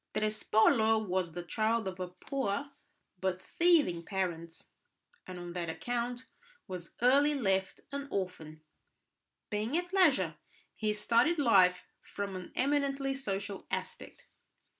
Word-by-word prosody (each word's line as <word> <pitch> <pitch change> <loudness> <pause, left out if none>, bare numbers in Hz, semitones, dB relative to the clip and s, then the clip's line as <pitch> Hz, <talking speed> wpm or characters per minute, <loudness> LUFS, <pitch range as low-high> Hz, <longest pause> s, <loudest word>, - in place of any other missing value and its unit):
Trespolo 220 +1 +3
was 180 -2 -1
the 175 +1 -5
child 220 +4 0
of 185 -1 -6
poor 275 0 -2 0.5
but 185 -1 -1
thieving 310 - +3
parents, 170 -3 -4 0.6
and 185 - -7
on 175 -1 -7
that 170 -2 -3
account 245 +6 -3 0.4
was 180 -3 -7
early 285 +4 +5
left 195 -7 0
an 280 0 -4
orphan. 160 - -4 0.9
Being 215 +8 0
at 355 +1 -3
leisure, 265 - +3 0.4
he 215 -1 -1
studied 235 +10 +3
life 185 -9 +4 0.2
from 200 -1 -5
an 185 -1 -7
eminently 275 0 +1
social 200 -6 -4
aspect. - - -6
210 Hz, 120 wpm, -32 LUFS, 180-270 Hz, 0.9 s, early